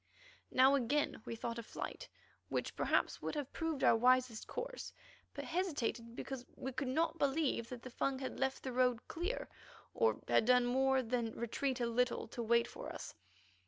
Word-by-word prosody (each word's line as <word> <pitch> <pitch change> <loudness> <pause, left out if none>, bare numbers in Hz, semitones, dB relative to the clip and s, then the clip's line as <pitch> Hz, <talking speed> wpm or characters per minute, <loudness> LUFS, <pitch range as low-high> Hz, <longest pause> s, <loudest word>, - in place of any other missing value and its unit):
Now 260 +2 +6
again 280 -1 +1
we - - -4
thought 230 +1 -3
of 230 - -7
flight, - - -6 0.4
which - - -2
perhaps - - +1
would - - -3
have 290 -3 -4
proved 325 -4 -2
our - - +7
wisest 250 -1 +3
course, - - -5 0.4
but - - -4
hesitated 285 -10 -1
because 265 -1 -5
we 265 - -4
could 270 +1 -2
not 320 +5 +1
believe 275 -5 +1
that 245 -2 -7
the 255 - -8
Fung 270 +2 0
had 260 -1 -5
left 265 0 0
the 260 - -3
road 250 -2 +2
clear, 355 +9 -3 0.5
or 460 -1 +3
done 250 +2 +4
more 265 +1 +3
than 230 -1 -1
retreat 255 +3 -1
a 240 - +1
little 245 +2 +1
to 240 - -5
wait 235 +1 +3
for - - -7
us. - - -7
255 Hz, 175 wpm, -36 LUFS, 235-280 Hz, 0.5 s, our